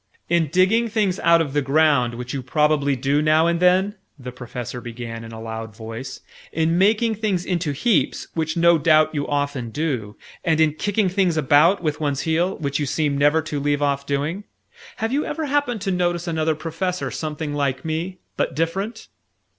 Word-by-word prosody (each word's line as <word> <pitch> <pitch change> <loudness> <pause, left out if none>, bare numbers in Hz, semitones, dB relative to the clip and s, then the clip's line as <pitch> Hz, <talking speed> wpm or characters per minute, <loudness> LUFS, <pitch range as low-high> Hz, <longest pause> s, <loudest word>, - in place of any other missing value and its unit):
"In 170 -2 +2
digging 185 +9 +3
things 210 -4 0
out 170 0 +4
of 145 -4 -3
the 145 - +2
ground 135 -4 +2
which 125 +1 -6
you 135 - -3
probably 145 +1 +1
do 140 +3 +1
now 155 +1 +4
and 170 0 +1
then," 185 +3 +3 0.2
the 125 -2 -8
Professor 125 0 -7
began 115 -1 -7
in 115 - -9
a 110 - -8
loud 110 -1 -6
voice; 115 +3 -7 0.3
"in 165 +1 +1
making 220 +3 +3
things 205 -5 -1
into 170 -4 -1
heaps 175 - +1
which 160 0 -2
no 170 -1 +5
doubt 155 0 +4
you 145 -2 -2
often 145 -4 -2
do; 120 -7 -3 0.3
and 160 -3 +1
in 155 -2 +4
kicking 205 +4 0
things 180 -3 +1
about 155 +6 +4
with 155 -2 -1
one 145 -2 0
heel 165 +6 0
which 140 -2 -2
you 145 - -1
seem 145 0 0
never 145 +3 +3
to 150 -2 -3
leave 145 0 0
off 140 -1 0
doing; 150 +8 -2 0.5
have 225 +3 -2
you 290 +2 +1
ever 315 +1 -3
happened 285 -6 0
to 195 -1 -1
notice 175 -1 0
another 160 -1 0
Professor 165 +4 -3
something 155 -1 -4
like 140 -2 -1
me, 165 +4 -3 0.2
but - - -1
different?" 195 +8 -2
155 Hz, 185 wpm, -22 LUFS, 140-180 Hz, 0.5 s, no